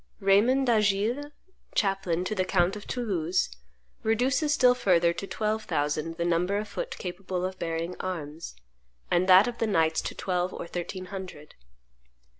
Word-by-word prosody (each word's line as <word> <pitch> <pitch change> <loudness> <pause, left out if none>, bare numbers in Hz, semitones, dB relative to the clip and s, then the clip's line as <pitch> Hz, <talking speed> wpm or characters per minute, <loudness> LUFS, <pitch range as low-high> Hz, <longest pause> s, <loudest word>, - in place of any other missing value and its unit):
Raymond 220 +7 +4
d'Agiles, 220 +4 +2 0.5
chaplain 195 -4 +1
to 215 - -2
the 190 -3 +1
count 185 0 +1
of 210 - -9
Toulouse, 185 - -1 0.5
reduces 255 +7 +1
still 255 -5 +5
further 175 -8 +3
to 195 - -6
twelve 215 +1 -2
thousand 150 +3 -1
the 170 - -1
number 175 +3 +1
of 210 +1 -3
foot - - -5
capable 180 0 -4
of 185 0 -5
bearing 165 +1 -3
arms, 160 - -5 0.6
and 185 +2 +2
that 185 +4 +8
of 240 -1 -5
the 225 - +1
knights 160 -5 +2
to - - -5
twelve 180 -1 -1
or - - -5
thirteen 175 +2 -5
hundred. 180 -6 -8
190 Hz, 155 wpm, -27 LUFS, 175-215 Hz, 0.6 s, that